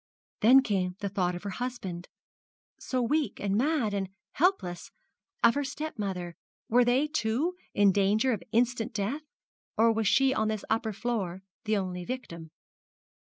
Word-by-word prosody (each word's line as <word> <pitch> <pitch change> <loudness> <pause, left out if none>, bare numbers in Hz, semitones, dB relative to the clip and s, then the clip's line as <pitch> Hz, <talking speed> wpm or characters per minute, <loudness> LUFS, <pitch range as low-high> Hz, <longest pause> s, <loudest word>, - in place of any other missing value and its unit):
Then 260 +5 +7
came 185 -6 -1
the 200 -1 -3
thought 180 -3 0
of 175 - -7
her 200 - -4
husband 190 -9 -4 0.7
so 255 -1 -1
weak, 295 +5 0
and 200 -1 0
mad, 255 -3 +1
and 195 -2 -2 0.2
helpless 270 - 0 0.5
of 235 - +7
her 285 - -1
stepmother. 205 - -4 0.3
Were 245 +2 +5
they, 245 +4 +3
too, 300 +3 0 0.2
in 200 -1 +5
danger 205 +6 +2
of 210 - -3
instant 235 0 +1
death? 220 +9 -1 0.6
Or 230 +1 +5
was 220 -1 0
she 270 +4 +4
on 220 -4 0
this 215 -1 -3
upper 220 0 +1
floor 200 -4 -3 0.2
the 215 -1 +2
only 180 -2 -3
victim? 170 -9 -6
220 Hz, 155 wpm, -29 LUFS, 195-255 Hz, 0.7 s, Then